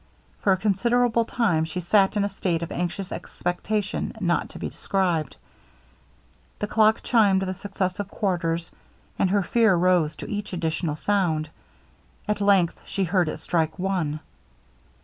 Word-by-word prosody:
For 200 - +2
a 190 - +4
considerable 230 +4 +2
time 205 -11 +1
she 160 +3 -4
sat 195 +3 +3
in 205 - +2
a - - +1
state 175 -4 -1
of 170 - -6
anxious 180 +2 -3
expectation 200 +3 -3
not 175 -4 0
to - - -10
be - - -4
described. 175 -7 -1 1.2
The - - -2
clock 215 +1 +3
chimed 200 -5 +3
the 185 -1 -2
successive 195 0 -3
quarters; 170 -5 -1 0.5
and 190 - +3
her 200 +1 +2
fear 220 -1 +3
rose 175 -3 +2
to - - -8
each 205 -1 -4
additional 165 -2 -1
sound. 160 -4 0 0.8
At 210 -1 -1
length 195 -4 +3
she 195 - -2
heard 180 -2 +1
it - - -4
strike 160 -1 -1
one. 180 -5 -1
190 Hz, 150 wpm, -25 LUFS, 170-205 Hz, 1.2 s, a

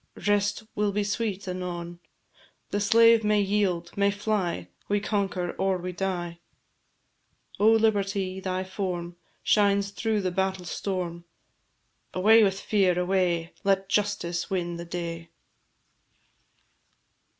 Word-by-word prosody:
Rest 205 +1 +1
will 210 -1 0
be 205 +1 0
sweet 205 -1 -2
anon; 175 -1 -5 0.7
The 205 - 0
slave 230 +2 +5
may 210 0 +3
yield, 195 -4 0
may 200 0 +3
fly, 200 - -1 0.2
We 205 0 +2
conquer, 195 -4 -1
or 190 -1 +1
we 180 +1 -5
die! 175 -2 -3 1.2
O 210 - +4
Liberty! 200 -4 +1
thy 185 -1 -2
form 180 -3 -4 0.3
Shines 200 -1 +3
through 220 0 -1
the 185 -1 -1
battle 190 0 -1
storm. 175 -1 -4 0.9
Away 220 +5 +6
with 195 -1 +1
fear, 190 -5 +2
away! 180 -2 0
Let 195 -1 +1
justice 200 -5 -1
win 175 -2 -2
the 170 - -6
day. 170 -1 -5
190 Hz, 115 wpm, -27 LUFS, 175-205 Hz, 1.2 s, Away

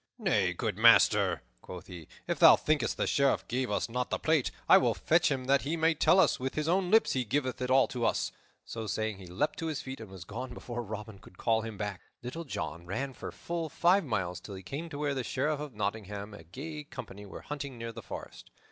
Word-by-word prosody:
"Nay, - - +2
good - - -3
master," - - +5 0.2
quoth 90 0 -9
he, 90 -5 -10 0.2
"if - - -2
thou - - +10
thinkest 155 -1 0
the - - +1
Sheriff 140 -1 +2
gave 125 +1 -1
us 105 - 0
not 125 +2 -2
the - - 0
plate, 155 -5 +2 0.2
I - - +8
will - - +1
fetch 170 +2 +3
him, 130 -3 -2
that 135 +1 +3
he 155 +5 -2
may 165 +1 +3
tell 175 +4 +4
us - - +4
with 130 +1 -3
his 155 0 -1
own 180 +1 +2
lips 220 +3 +4
he 130 - +1
giveth 130 +2 -1
it 125 - -1
all 130 0 +5
to 125 -2 -3
us." - - 0 0.3
So 115 -1 -5
saying 110 -2 -2
he 95 - -10
leaped 145 - -1
to 165 - -2
his 155 -3 -3
feet, 130 +1 -7
and 110 -3 -9
was 95 -3 -9
gone 125 +1 -6
before 120 -1 -5
Robin 105 -2 -7
could 95 -2 -17
call 115 -1 +2
him 110 -2 -6
back. 105 -3 -4 0.2
Little 165 +8 -5
John 85 - -5
ran 135 +8 -3
for - - -7
full 170 -2 -4
five 180 +6 +3
miles 95 - -2
till 100 - -9
he 95 - -9
came 150 - -5
to 145 - -6
where 145 -1 0
the 130 -2 -2
Sheriff 145 +4 -1
of 145 -5 -7
Nottingham 105 0 -4
and 100 - -10
a - - -18
gay 150 - -7
company 100 -7 -9
were - - -9
hunting 140 -3 -6
near 115 0 -5
the 115 0 -8
forest. - - -9
125 Hz, 240 wpm, -30 LUFS, 105-150 Hz, 0.3 s, thou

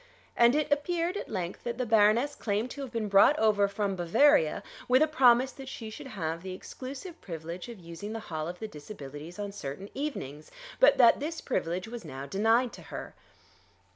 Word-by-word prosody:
And 240 +2 +5
it 300 0 0
appeared 335 +5 0
at - - -5
length 175 -1 -4
that 235 -1 -3
the 250 - -1
Baroness 225 +5 +4
claimed 215 +3 -2
to 285 - -7
have 265 -3 -6
been 225 -3 -2
brought 200 +9 +6
over 210 -4 +3
from 200 -1 -2
Bavaria 175 - +3 0.2
with 255 +4 +5
a - - +3
promise 260 -4 +5
that 270 -1 -10
she 225 -4 -7
should 240 - -9
have 165 -8 -4
the 185 0 -6
exclusive 280 - -8
privilege 170 +3 -7
of 230 -4 -9
using 170 +5 -8
the 225 - -4
hall 160 -7 -5
of 175 +1 -6
the 220 - -5
Disabilities 150 -2 -9
on 205 -1 -4
certain 190 0 -7
evenings, 155 - -5 0.3
but - - +6
that 240 -3 +6
this 315 +3 -4
privilege 180 -5 -2
was 235 0 -7
now 135 +1 -7
denied 225 - +2
to - - -10
her. - - -8
215 Hz, 195 wpm, -29 LUFS, 180-260 Hz, 0.3 s, brought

